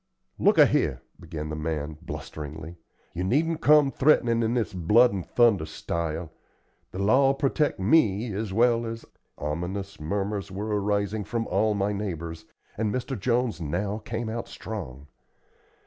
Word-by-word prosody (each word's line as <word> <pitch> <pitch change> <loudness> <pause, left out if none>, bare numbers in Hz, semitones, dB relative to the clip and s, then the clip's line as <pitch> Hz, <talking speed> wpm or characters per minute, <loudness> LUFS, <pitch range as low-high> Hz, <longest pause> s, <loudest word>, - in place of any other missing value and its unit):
"Look - - +4
a - - +9
here," - - 0 0.2
began 80 -2 -6
the 75 - -3
man, 75 -1 -3
blusteringly, 80 +2 -7 0.4
"you 90 - -3
needn't 155 - +1
come 150 -2 +5
threatenin' 120 -5 +3
in 115 +1 0
this 110 -8 -1
blood 105 +7 +4
and 95 -3 -3
thunder 110 -9 +3
style. 80 0 -4 0.6
The - - -8
law'll 130 +8 +4
protect 145 -1 0
me 105 -1 +3
as 105 0 -3
well 115 +2 +3
as 115 0 -6 0.2
" - - -49
Ominous 95 +6 -4
murmurs 100 +5 -2
were 105 +2 -2
arising 100 +1 0
from 115 +2 -2
all 105 +3 +1
my 100 +1 0
neighbors, 85 -5 -5 0.3
and 110 -2 +1
Mr. 130 +3 -3
Jones 120 -1 0
now 100 +7 -2
came 115 +1 -4
out 115 +1 -4
strong. 75 - -7
100 Hz, 150 wpm, -26 LUFS, 85-115 Hz, 0.6 s, a